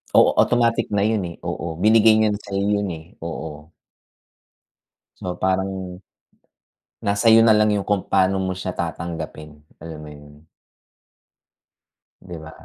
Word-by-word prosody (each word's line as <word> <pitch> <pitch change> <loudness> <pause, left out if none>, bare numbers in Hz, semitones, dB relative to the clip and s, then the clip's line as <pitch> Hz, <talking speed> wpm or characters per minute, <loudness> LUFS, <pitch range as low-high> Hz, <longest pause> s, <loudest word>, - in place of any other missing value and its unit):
Oo, - - +6
automatic 120 -1 +2
na 100 - +2
yun, 110 +1 +1
eh. 85 - -9
Oo. 85 -1 -4
Binigay 110 0 +6
niya 110 -1 +3
na 105 - -3
sa'yo 100 -1 -3 0.2
yun, 100 - -2
eh. 80 0 -12
Oo. 80 -2 -7 1.5
So 90 - -4
parang, 95 0 -2 1.0
nasa 100 +3 +3
iyo 115 - +8
nalang 105 -1 +4
yung 100 -1 -2
kung 100 -2 +1
pano 95 +1 +2
mo 95 -1 -1
siya 90 0 -5
tatanggapin, 80 -3 -7
alam 80 0 -8
mo - - -10
yun? 75 +1 -16 1.8
Di 90 -2 -10
ba? 80 0 -10
95 Hz, 140 wpm, -22 LUFS, 80-105 Hz, 1.8 s, iyo